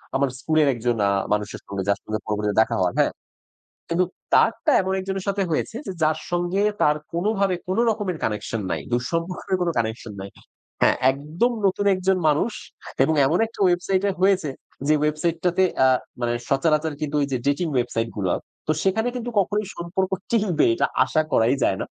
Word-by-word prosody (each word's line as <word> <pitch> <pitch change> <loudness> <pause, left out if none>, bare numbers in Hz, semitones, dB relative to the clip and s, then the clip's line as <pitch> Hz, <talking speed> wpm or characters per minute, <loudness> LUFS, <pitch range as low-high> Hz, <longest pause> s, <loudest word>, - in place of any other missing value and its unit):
আমার 135 0 +2
স্কুলের 155 -2 +2
একজন 120 0 -1
আ - - +3 0.2
মানুষের 105 0 -3
সঙ্গে 100 -1 -3
যার 100 - +2
সঙ্গে 110 0 -3
পরবর্তীতে 105 0 0
দেখা 110 - +1
হওয়ার, 90 -1 +1
হ্যাঁ। - - +3 0.8
কিন্তু 170 +2 +2 0.3
তারটা 230 0 +3
এমন 190 0 -2
একজনের 190 0 -4
সাথে 200 0 0
হয়েছে 190 +8 -1
যে, 190 - -3
যার 155 0 +2
সঙ্গে 175 +3 0 0.2
তার 150 0 +4 0.2
কোনো 175 +5 0
ভাবে 195 -2 +2
কোনো 190 +5 +1
রকমের 205 -6 -2
কানেকশন 105 +1 -2
নাই। - - -1
দূরসম্পর্কের 165 +9 -1
কোনো 175 -1 +1
কানেকশন 110 0 -3
নাই। 100 +1 -7 0.5
হ্যাঁ, - - +5
একদম 155 - -1
নতুন 200 +2 0
একজন 185 0 +1
মানুষ 155 +10 +1 0.5
এবং 160 - +2
এমন 160 +6 +2
একটা 225 - -17
ওয়েবসাইটে 185 +2 +2
এ 185 - -13
হয়েছে 190 -5 +3 0.4
যে, 155 - +5
ওয়েবসাইটটাতে 165 +4 0 0.2
আ - - +6 0.3
মানে 120 0 0 0.2
সচারাচর 155 +3 +2
কিন্তু 150 -1 -2
ওই 140 - +1
যে, - - +2
ডেটিং 145 +5 +1
ওয়েবসাইট 120 -2 0
গুলা 95 -3 0 0.3
তো 155 - +2
সেখানে 220 +5 +1
কিন্তু 245 0 -4
কখনোই 205 +1 +1
সম্পর্ক 185 +2 -2 0.2
টিকবে 205 -9 +2
এটা - - +1 0.2
আশা 155 +4 +1
করাই 115 +5 +3
যায় 95 - +1
না। - - -5
165 Hz, 175 wpm, -23 LUFS, 125-190 Hz, 0.8 s, আ